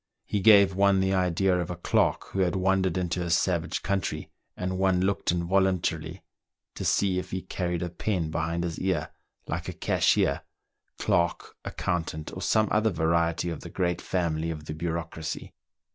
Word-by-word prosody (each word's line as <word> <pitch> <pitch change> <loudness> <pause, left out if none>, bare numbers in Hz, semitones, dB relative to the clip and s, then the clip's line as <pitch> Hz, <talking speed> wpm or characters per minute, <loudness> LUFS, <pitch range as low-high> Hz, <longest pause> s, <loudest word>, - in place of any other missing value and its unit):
He 105 - -1
gave 100 -2 +7
one 100 0 +4
the 95 0 +1
idea 90 0 +2
of 85 - -3
a 90 - -3
clerk - - +1
who 95 - -4
had 90 -1 +2
wandered 95 -1 +1
into 90 0 -1
a 85 - -2
savage 85 0 +1
country, 95 -1 -2 0.3
and 95 0 -2
one 95 -1 +3
looked 95 -1 +1
involuntarily 90 -2 0 0.5
to - - -6
see 95 -2 +2
if - - -7
he 95 0 -4
carried 90 -2 -2
a 90 - -3
pen 85 -3 -2
behind 80 +1 -1
his 85 -2 -3
ear, 90 -5 -1 0.3
like - - -4
a - - -4
cashier, 70 - +2 0.6
clerk, 85 0 0
accountant, 80 -3 -3
or - - -6
some 110 0 +3
other 110 +1 +3
variety 85 0 +1
of 80 - -5
the - - -9
great 90 -2 -1
family 85 -3 -1
of 75 -2 -5
the 75 - -5
bureaucracy. 80 0 -4
90 Hz, 170 wpm, -27 LUFS, 85-95 Hz, 0.6 s, gave